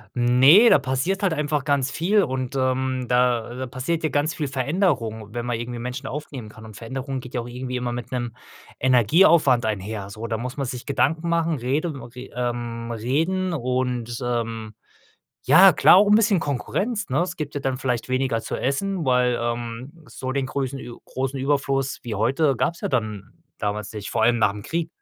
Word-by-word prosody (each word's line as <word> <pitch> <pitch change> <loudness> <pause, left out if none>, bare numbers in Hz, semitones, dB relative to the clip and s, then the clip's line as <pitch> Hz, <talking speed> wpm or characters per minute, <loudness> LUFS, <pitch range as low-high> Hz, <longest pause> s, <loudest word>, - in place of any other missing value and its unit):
Ne, 130 - +6
da - - +6
passiert 135 +10 -1
halt 190 -4 +2
einfach 150 -1 -1
ganz 140 -2 +1
viel 185 +9 +2
und, 130 0 -3
ähm, 130 -1 0
da 125 0 0
passierte 155 +4 -2
ganz 145 +4 0
viel 150 -3 -3
Veränderung, 125 - -1
wenn 120 0 -3
man 120 -2 -1
irgendwie 120 +1 -5
Menschen 125 +3 -5
aufnehmen 135 -5 -6
kann 110 +1 -13
und 110 -2 -11
Veränderung 130 +3 -5
geht 125 0 -11
ja 120 - 0
auch 115 - -7
irgendwie 125 +1 -5
immer 125 -1 -2
mit 120 0 -6
'nem 120 -2 -3 0.5
Energieaufwand 130 - +4
einher, 105 -1 -3
so. 110 +3 -6
Da 115 -1 -2
muss 125 +4 -5
man 140 - -2
sich 125 0 -6
Gedanken 145 +5 0
machen, 165 -3 +1
rede 145 +6 -1
w 135 - -8
re 125 +2 -10
ähm, 120 -1 -3
reden 160 - -1
und, 125 -4 -2
ähm, 115 -3 -3 0.7
ja, 180 +8 +7
klar 175 - +6
auch 205 +2 +6
'n 210 - +6
bisschen 210 -3 +4
Konkurrenz, 200 - -2
ne? - - +1
Es 180 0 -3
gibt 150 -2 -5
ja - - -1
dann 135 -1 -1
vielleicht 125 -2 -2
weniger 130 -3 0
zu - - -5
essen, 175 +7 -1
weil, 125 -2 +2
ähm. 120 +6 -5
so 130 - -6
den 135 0 -1
größen 135 0 -3
Ü 120 -2 -9
großen 135 +1 -3
Überfluss 135 -1 0
wie 115 -3 -4
heute 135 +7 +2
gab's 170 +7 -1
ja - - -2
dann 110 -6 -3 0.3
damals 105 0 -3
nicht, 105 -2 -6
vor 115 - 0
allem 120 +1 +4
nach 105 -2 +3
'm 105 0 -8
Krieg. 165 +4 -2
130 Hz, 190 wpm, -23 LUFS, 120-145 Hz, 0.7 s, ja